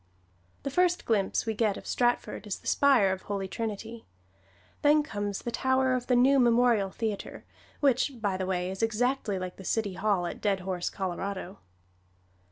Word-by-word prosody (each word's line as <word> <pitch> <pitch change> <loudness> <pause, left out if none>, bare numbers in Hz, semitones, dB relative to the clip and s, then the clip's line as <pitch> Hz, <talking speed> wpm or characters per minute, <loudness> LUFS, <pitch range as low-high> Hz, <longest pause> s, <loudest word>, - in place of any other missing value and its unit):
The 275 - -3
first 360 +3 +2
glimpse 205 -4 +1
we 225 - -1
get 215 -2 +1
of - - -10
Stratford 240 -3 0
is 200 - -3
the - - -22
spire 260 -9 +4
of 190 0 -3
Holy 200 -2 -3
Trinity; 225 +2 -5 0.7
then 300 +1 +5
comes 205 -8 -4
the 240 - -3
tower 260 +1 +2
of 250 -1 -2
the 250 - +3
new 265 +3 +5
Memorial 235 -4 +4
Theater, 215 0 -5 0.4
which, 275 0 +2
by 205 -3 0
the 185 0 -3
way, 180 -1 -1
is 190 - -6
exactly 225 -1 0
like 185 -1 -5
the 190 - -10
city 205 0 -1
hall 190 -1 0
at 175 - -6
Dead 200 -3 +1
Horse, 180 -1 -2
Colorado. 190 +1 -4
215 Hz, 175 wpm, -28 LUFS, 195-245 Hz, 0.7 s, then